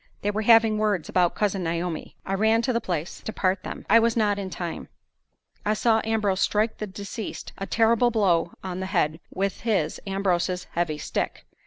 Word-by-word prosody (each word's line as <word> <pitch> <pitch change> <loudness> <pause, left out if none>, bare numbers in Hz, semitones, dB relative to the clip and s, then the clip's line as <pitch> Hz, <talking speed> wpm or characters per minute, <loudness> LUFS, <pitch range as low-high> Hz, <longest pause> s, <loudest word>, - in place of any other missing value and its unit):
They 205 - +1
were 210 +1 -1
having 225 -1 +5
words 205 -6 0
about 180 -2 +2
Cousin 200 -3 0
Naomi. 170 0 -3
I 195 - -2
ran 220 +3 +3
to 255 - +1
the 235 - 0
place 170 -2 -4
to - - -5
part 185 -2 0
them. - - -7
I 230 +3 +7
was 230 0 +2
not 205 -2 +2
in 195 -1 -4
time. 175 -2 -5 0.8
I 215 +1 +1
saw 225 0 +3
Ambrose 210 -4 0
strike 215 +2 +1
the 215 - -3
deceased 200 +3 -7
a 195 - -4
terrible 230 +1 +3
blow 185 -7 +2
on 185 -1 -4
the 190 - -3
head 155 -3 0
with 195 0 -2
his 195 -9 0
(Ambrose's) 185 -2 0
heavy 165 -3 -1
stick. - - -3
200 Hz, 190 wpm, -25 LUFS, 180-220 Hz, 0.8 s, I